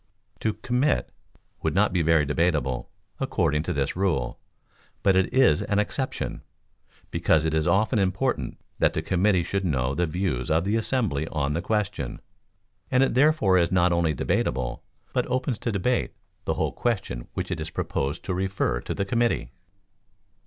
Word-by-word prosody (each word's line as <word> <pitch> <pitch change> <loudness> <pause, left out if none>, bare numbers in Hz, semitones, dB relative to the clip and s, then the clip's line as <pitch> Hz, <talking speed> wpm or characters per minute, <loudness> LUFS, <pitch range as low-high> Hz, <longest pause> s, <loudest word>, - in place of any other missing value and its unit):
To 110 - 0
"Commit" 125 - 0 0.5
would - - -1
not 100 -1 +3
be 90 - +2
very 80 -2 +4
debatable, 75 -4 0 0.3
according 75 +1 +1
to - - -3
this - - -1
rule, 90 -10 0 0.6
but 95 - +4
it 95 -1 +2
is 130 - +4
an 100 - -1
exception, 130 +6 -2 0.7
because 80 0 +2
it 80 - 0
is 80 -1 +1
often 110 +3 +3
important 95 -2 0 0.2
that - - +3
the - - -2
committee 95 -1 +2
should 100 +3 -2
know 65 -6 0
the 85 +4 0
views 80 -7 -2
of 80 +1 +3
the 100 +3 0
assembly 110 - 0
on 75 -2 -1
the 85 - -1
question, 105 +1 -2 0.7
and 130 0 +4
it 135 - +1
therefore 130 - +4
is 85 -1 +1
not 90 -1 +3
only 85 -3 +1
debatable, 65 0 -1 0.3
but - - 0
opens 130 -2 -1
to 115 - -1
debate 110 +5 0 0.3
the - - 0
whole - - 0
question 95 - -2
which - - -3
it - - -2
is - - -4
proposed 70 +4 -2
to 95 - -2
refer 95 -10 -1
to - - -4
the 100 - -1
committee. 120 +4 0
90 Hz, 165 wpm, -26 LUFS, 80-105 Hz, 0.7 s, very